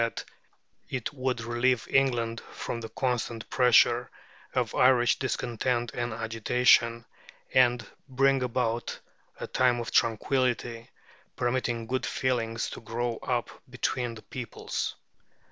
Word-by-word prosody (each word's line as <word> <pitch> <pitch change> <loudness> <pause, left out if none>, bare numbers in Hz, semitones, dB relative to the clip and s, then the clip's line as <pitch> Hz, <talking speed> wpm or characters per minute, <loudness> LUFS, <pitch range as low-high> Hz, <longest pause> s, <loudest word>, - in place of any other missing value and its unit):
that 115 0 -2 0.6
it 130 +1 -3
would 130 -3 -1
relieve 120 +1 +1
England 120 -4 +2
from 115 - -4
the 115 - -6
constant 120 -2 -2
pressure 125 -1 +4 0.5
of - - 0
Irish 125 -1 +4
discontent 120 -1 -1
and 120 0 -2
agitation, 115 +1 +2 0.5
and 120 -3 +4 0.2
bring 135 +1 +3
about 120 -2 -1 0.4
a - - -4
time 125 -2 +2
of 120 - -4
tranquillity, 120 0 +1 0.5
permitting 120 -2 -1
good 130 +3 -2
feeling 120 -3 -1
to - - -4
grow 115 0 -2
up 120 -2 -2 0.2
between 125 -1 -2
the 110 - -12
peoples. 120 -4 -4
120 Hz, 115 wpm, -28 LUFS, 115-125 Hz, 0.6 s, pressure